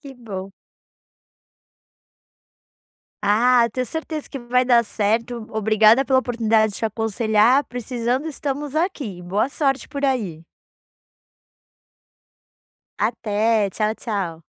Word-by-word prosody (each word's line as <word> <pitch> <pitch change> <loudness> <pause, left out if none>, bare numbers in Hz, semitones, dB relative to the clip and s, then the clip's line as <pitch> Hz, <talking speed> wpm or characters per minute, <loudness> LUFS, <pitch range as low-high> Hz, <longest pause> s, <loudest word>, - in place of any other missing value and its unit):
Que 275 -2 -11
bom. 195 -6 -8 2.7
Ah, 235 +3 +4
tenho 255 -1 -2
certeza 315 0 -5
que - - -8
vai 250 0 +1
dar 240 -2 +4
certo. 225 +2 -1
Obrigada 220 +3 +4
pela 260 -1 +3
oportunidade 225 -4 +1
de - - -5
te - - -2
aconselhar. 225 +3 +2
Precisando, 245 +3 -2
estamos 290 -1 -4
aqui. 285 - -2
Boa 200 +8 0
sorte 275 -2 -1
por 280 0 -4
aí! 210 - -1 2.6
Até. 220 -1 +1
Tchau, 215 +2 -1
tchau. 190 -9 -4
230 Hz, 105 wpm, -22 LUFS, 215-260 Hz, 2.7 s, Ah